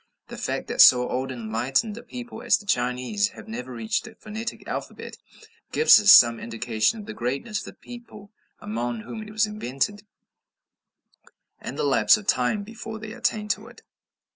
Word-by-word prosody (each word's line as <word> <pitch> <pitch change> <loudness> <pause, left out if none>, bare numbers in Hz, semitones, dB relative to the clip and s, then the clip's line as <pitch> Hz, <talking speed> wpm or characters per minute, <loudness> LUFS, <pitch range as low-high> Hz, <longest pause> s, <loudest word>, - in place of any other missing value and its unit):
The - - -8
fact - - -3
that - - +3
so 125 -1 +7
old 130 +1 -3
and 120 -3 -7
enlightened 130 - -1
a 235 - -9
people 245 0 -9
as - - +3
the 205 - -14
Chinese 125 - 0
have 110 - -11
never 125 +3 -7
reached 115 - -3
a 220 - -13
phonetic 220 +2 -7
alphabet, - - -6 0.6
gives 460 - +6
us 210 0 +7
some 120 -1 +8
indication 115 - -1
of 210 - -9
the - - -7
greatness 140 - -3
of - - -9
the - - -10
people 230 -4 -13 0.3
among 115 +1 -4
whom 220 - -8
it 215 - -9
was 215 +1 +1
invented, 205 0 -3 1.6
and - - -7
the - - -1
lapse 115 -7 +4
of 105 - -10
time 125 - +1
before 220 +1 -8
they 220 0 -8
attained 210 -1 -1
to 210 +3 -4
it. 240 - -16
140 Hz, 180 wpm, -24 LUFS, -, 1.6 s, some